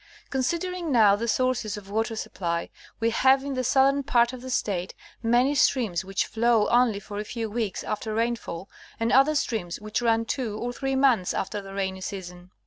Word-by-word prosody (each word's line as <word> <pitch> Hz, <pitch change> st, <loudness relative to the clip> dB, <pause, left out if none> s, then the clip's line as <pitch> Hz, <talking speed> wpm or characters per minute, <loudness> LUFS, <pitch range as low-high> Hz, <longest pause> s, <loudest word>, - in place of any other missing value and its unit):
Considering 340 Hz, +5 st, -1 dB
now 215 Hz, -5 st, +6 dB
the 230 Hz, +3 st, -3 dB
sources 240 Hz, -4 st, 0 dB
of 200 Hz, -2 st, -10 dB
water 225 Hz, +2 st, -1 dB
supply: 170 Hz, -5 st, -3 dB, 0.3 s
we 230 Hz, 0 st, +1 dB
have 265 Hz, +3 st, +4 dB
in 280 Hz, 0 st, -3 dB
the 255 Hz, -1 st, -1 dB
southern 275 Hz, +2 st, +3 dB
pai't 240 Hz, -2 st, +2 dB
of 255 Hz, -, -8 dB
the 260 Hz, -, -7 dB
State 195 Hz, -7 st, -2 dB, 0.3 s
many 240 Hz, +4 st, +3 dB
streams 235 Hz, -, +2 dB
which 195 Hz, 0 st, -1 dB
flow 230 Hz, -1 st, +2 dB
only 240 Hz, -4 st, +3 dB
for 205 Hz, 0 st, -7 dB
a -, -, -2 dB
few 225 Hz, +1 st, -4 dB
weeks 220 Hz, -3 st, -2 dB
after 215 Hz, +1 st, -3 dB
rainfall, 225 Hz, -6 st, -2 dB, 0.3 s
and 230 Hz, +1 st, 0 dB
other 275 Hz, +4 st, +5 dB
streams 215 Hz, -11 st, -2 dB
which 215 Hz, +2 st, -3 dB
run 230 Hz, -1 st, +2 dB
two 225 Hz, -3 st, -3 dB
or 245 Hz, +2 st, -3 dB
three 270 Hz, +2 st, -2 dB
months 260 Hz, -9 st, +3 dB
after 205 Hz, +2 st, -3 dB
the 195 Hz, 0 st, -10 dB
rainy 190 Hz, -1 st, -2 dB
season. 180 Hz, -2 st, -7 dB
230 Hz, 190 wpm, -26 LUFS, 205-255 Hz, 0.3 s, now